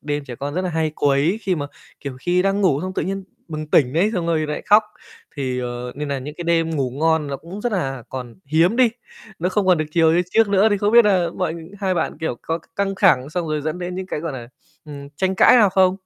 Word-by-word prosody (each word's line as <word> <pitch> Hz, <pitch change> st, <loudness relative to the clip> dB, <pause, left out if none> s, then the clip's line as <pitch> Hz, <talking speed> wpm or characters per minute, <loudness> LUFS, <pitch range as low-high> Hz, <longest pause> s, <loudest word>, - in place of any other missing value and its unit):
đêm 145 Hz, -1 st, -3 dB
trẻ 125 Hz, -3 st, -8 dB
con 145 Hz, +2 st, -5 dB
rất 185 Hz, -, -1 dB
là 185 Hz, -, -2 dB
hay 160 Hz, -1 st, 0 dB
quấy, 145 Hz, +9 st, +1 dB
khi 190 Hz, -2 st, 0 dB
mà, 145 Hz, -3 st, -3 dB, 0.3 s
kiểu, 140 Hz, -3 st, -6 dB
khi 180 Hz, +3 st, +1 dB
đang 195 Hz, +1 st, +1 dB
ngủ 150 Hz, -7 st, +2 dB
xong 185 Hz, 0 st, -4 dB
tự -, -, -1 dB
nhiên 195 Hz, +1 st, -4 dB, 0.2 s
bừng 155 Hz, -1 st, -5 dB
tỉnh 130 Hz, -3 st, +4 dB
đấy 185 Hz, +7 st, +2 dB
xong 170 Hz, -2 st, -1 dB
rồi 160 Hz, -2 st, +1 dB
nlại 150 Hz, -, -4 dB
khóc 210 Hz, +1 st, +6 dB, 0.5 s
thì, 130 Hz, -2 st, -2 dB
ờ, 125 Hz, 0 st, -5 dB
nên 150 Hz, 0 st, -5 dB
nà 140 Hz, -1 st, -2 dB
những 150 Hz, +3 st, -7 dB
cái 175 Hz, -, -6 dB
đêm 165 Hz, -1 st, +1 dB
ngủ 135 Hz, -5 st, -1 dB
ngon 160 Hz, +2 st, +1 dB
nó 140 Hz, -1 st, -4 dB
cũng 180 Hz, +7 st, -9 dB
rất 240 Hz, 0 st, -2 dB
là 135 Hz, -, -2 dB
còn 125 Hz, -3 st, -7 dB
hiếm 165 Hz, -, +2 dB
đi, 255 Hz, -2 st, +5 dB, 0.5 s
nó 180 Hz, +2 st, 0 dB
không 200 Hz, 0 st, 0 dB
còn 180 Hz, -3 st, +4 dB
được 155 Hz, -, 0 dB
chiều 160 Hz, -1 st, +3 dB
như 175 Hz, -, +3 dB
trước 225 Hz, -2 st, +3 dB
nữa 200 Hz, +2 st, +4 dB
thì 205 Hz, -, +2 dB
không 205 Hz, +2 st, +1 dB
biết 235 Hz, -1 st, +8 dB
nà 185 Hz, -4 st, +3 dB
mọi 180 Hz, -3 st, -1 dB, 0.3 s
hai 190 Hz, -2 st, 0 dB
bạn, 160 Hz, -3 st, -2 dB
kiểu, 140 Hz, -7 st, -2 dB
có 165 Hz, +1 st, -2 dB
c -, -, -23 dB
căng 195 Hz, 0 st, 0 dB
thẳng 150 Hz, -8 st, +3 dB
xong 175 Hz, 0 st, -2 dB
rồi 155 Hz, -1 st, -1 dB
dẫn 155 Hz, +3 st, -3 dB
đến 180 Hz, 0 st, -5 dB
những 185 Hz, 0 st, -5 dB
cái, 150 Hz, -, -4 dB
gọi 165 Hz, -3 st, -4 dB
là, 120 Hz, -2 st, -8 dB, 0.4 s
ừm, 140 Hz, -2 st, -9 dB
tranh 190 Hz, +2 st, 0 dB
cãi 220 Hz, -, +6 dB
nào 210 Hz, -4 st, +6 dB
không? 185 Hz, 0 st, +3 dB
165 Hz, 270 wpm, -21 LUFS, 145-190 Hz, 0.5 s, biết